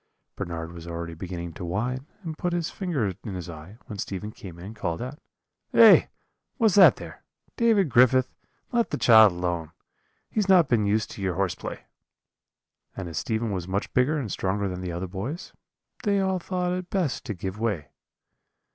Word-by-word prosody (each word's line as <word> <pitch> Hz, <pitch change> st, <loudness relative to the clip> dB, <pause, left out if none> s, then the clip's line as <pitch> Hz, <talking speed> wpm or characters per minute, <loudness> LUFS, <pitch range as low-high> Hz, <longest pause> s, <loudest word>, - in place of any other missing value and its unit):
"Bernard 85 Hz, -1 st, -5 dB
was 85 Hz, -1 st, -10 dB
already 85 Hz, 0 st, -5 dB
beginning 85 Hz, 0 st, -6 dB
to 90 Hz, -, -8 dB
whine 120 Hz, -, -2 dB, 0.2 s
and 160 Hz, -3 st, -5 dB
put 175 Hz, +2 st, -2 dB
his 170 Hz, -2 st, -1 dB
finger 145 Hz, -, -1 dB
in 100 Hz, -4 st, -5 dB
his 90 Hz, -3 st, -6 dB
eye, 85 Hz, +5 st, -10 dB
when 105 Hz, -5 st, -8 dB
Stephen 105 Hz, +2 st, -4 dB
came 90 Hz, -5 st, -11 dB
in 85 Hz, -, -10 dB
and 110 Hz, +3 st, -8 dB
called 85 Hz, -6 st, -3 dB
out: 130 Hz, +6 st, -6 dB, 0.6 s
"'Eh, -, -, +8 dB, 0.5 s
what's 225 Hz, -6 st, +3 dB
that 195 Hz, 0 st, +8 dB
there? -, -, -10 dB, 0.3 s
David 225 Hz, -6 st, +3 dB
Griffith, 130 Hz, +1 st, +4 dB, 0.4 s
let 235 Hz, -1 st, +1 dB
the -, -, -2 dB
child 110 Hz, -3 st, +7 dB
alone; 85 Hz, -2 st, -2 dB, 0.6 s
he -, -, -12 dB
has 200 Hz, -2 st, 0 dB
not 180 Hz, -5 st, +6 dB
been 110 Hz, -5 st, +2 dB
used 105 Hz, +1 st, 0 dB
to -, -, -8 dB
your 95 Hz, -3 st, -1 dB
horseplay.' 95 Hz, -1 st, -3 dB, 1.2 s
"And 95 Hz, -3 st, -4 dB
as 80 Hz, -3 st, -3 dB
Stephen 110 Hz, +8 st, -1 dB
was 90 Hz, -3 st, -3 dB
much 95 Hz, +3 st, -2 dB
bigger 130 Hz, +5 st, +3 dB
and 125 Hz, -9 st, -3 dB
stronger 100 Hz, +1 st, -1 dB
than 90 Hz, -1 st, -5 dB
the 90 Hz, -1 st, -4 dB
other 85 Hz, +2 st, -3 dB
boys, 125 Hz, -, -6 dB, 0.5 s
they 200 Hz, -3 st, +2 dB
all 190 Hz, -1 st, +1 dB
thought 180 Hz, 0 st, -2 dB
it 180 Hz, 0 st, -4 dB
best 180 Hz, -9 st, -1 dB
to 110 Hz, -6 st, -4 dB
give 95 Hz, +3 st, -5 dB
way. 105 Hz, -10 st, -2 dB
105 Hz, 185 wpm, -26 LUFS, -, 1.2 s, Eh